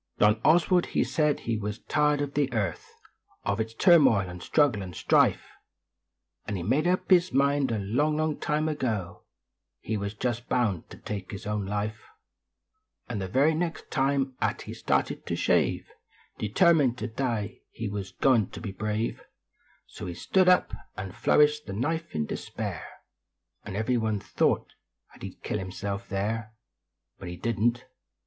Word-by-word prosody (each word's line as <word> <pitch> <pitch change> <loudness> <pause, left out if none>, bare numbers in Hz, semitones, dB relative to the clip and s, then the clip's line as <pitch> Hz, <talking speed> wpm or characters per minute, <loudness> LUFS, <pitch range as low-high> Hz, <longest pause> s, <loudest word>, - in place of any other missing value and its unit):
John 105 +1 +4
Oswald 175 +2 +4
he - - +1
said 150 -2 +1
he 115 -1 -1
was 105 0 -4
tired 150 -1 +2
of 145 -1 -3
the 140 -2 +1
earth 100 -7 -2 0.5
Of - - -1
its 110 +1 -3
turmoil 130 - +5
and 90 -1 -8
struggle 140 -6 +2
and 90 -3 -7
strife - - +3 1.0
Nd 100 - -2
he 85 - -4
made 135 - +2
up 185 +2 0
his 180 0 +5
mind 140 -1 +2
a 115 - 0
long, 130 +10 0
long 155 -1 0
time 150 +1 0
ago 115 - -2 0.6
He 110 - -3
was 100 +1 -4
just 120 +1 -3
bound 110 -9 0
t - - -11
take 100 -3 -6
his 100 - -7
own 105 -2 -2
life; 105 +2 -3 1.1
Xd 110 - -2
the 95 - -3
very 140 - +3
next 165 +1 -3
time 135 -1 +1
at - - -1
he - - -7
started - - -1
to - - -1
shave, - - +1 0.5
Determined 140 - +3
to 110 - -4
die, 115 -1 -3
he 115 - -5
wus 100 -1 -4
goin 120 -7 +3
t - - -9
be 100 - -5
brave; 110 +3 -2 0.6
So - - -8
he 85 - -5
stood 185 - +3
up 180 - +4 0.3
nd 95 -1 -5
flourished 150 +5 +3
the 95 - -5
knife 160 +10 -2
in 75 - 0
despair - - -5 0.8
Xd - - -5
every 110 +4 +1
one 110 -2 0
thought - - 0 0.4
at - - -18
he - - -5
d - - -18
kill 105 - -2
himself 100 +1 -5
there 110 +3 -2 0.6
Hut 95 - -8
he 90 - -7
didn 115 +3 +1
t. 120 - -16
115 Hz, 170 wpm, -27 LUFS, 100-145 Hz, 1.1 s, turmoil